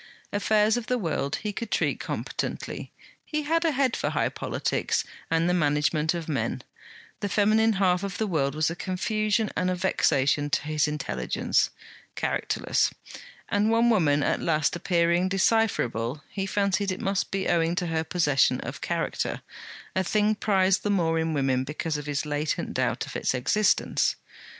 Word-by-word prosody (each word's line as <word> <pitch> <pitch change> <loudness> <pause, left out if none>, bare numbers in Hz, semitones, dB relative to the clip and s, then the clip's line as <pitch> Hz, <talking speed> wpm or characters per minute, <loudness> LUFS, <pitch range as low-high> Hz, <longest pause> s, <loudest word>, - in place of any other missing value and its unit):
Affairs 210 +2 +3
of 240 -1 -5
the 250 - +1
world 155 - -1
he 210 -1 -2
could 230 +1 -5
treat - - 0
competently; - - -4 0.3
he 305 -1 -3
had 330 +3 +1
a 330 - +3
head 265 -3 +1
for - - -1
high - - 0
politics - - -1 0.3
and 165 +1 +2
the 180 - +2
management 150 0 +1
of 170 -2 -5
men; 150 -4 -2 0.6
the 205 - -2
feminine 215 +2 +3
half 185 -2 +2
of 200 -1 -4
the 220 - 0
world 150 -7 0
was 155 +1 +1
a - - -4
confusion 215 +4 0
and 180 0 0
a 185 - 0
vexation 145 -6 +1
to - - 0
his 155 0 +1
intelligence, 135 - 0 0.5
characterless; - - 0 0.6
and 205 +2 +1
one 230 +1 +4
woman 150 -9 +3
at - - 0
last 155 -1 +1
appearing 175 0 +2
decipherable, 155 - +1
he 195 -1 -3
fancied 200 0 +1
it 185 - -4
must 195 0 -1
be 195 -1 -2
owing 165 0 +2
to 180 - -1
her 160 -1 -1
possession 150 -5 +2
of - - -7
character, - - -2 0.5
a 190 - +2
thing 210 +3 +2
prized 195 -3 +2
the 205 - -2
more 165 -5 +2
in 160 0 0
women 135 -2 +1
because 150 +3 -3
of 150 0 -7
his 145 +1 -1
latent 150 +1 -2
doubt - - 0
of - - -10
its - - 0
existence. 195 - +2
180 Hz, 170 wpm, -26 LUFS, 150-210 Hz, 0.6 s, one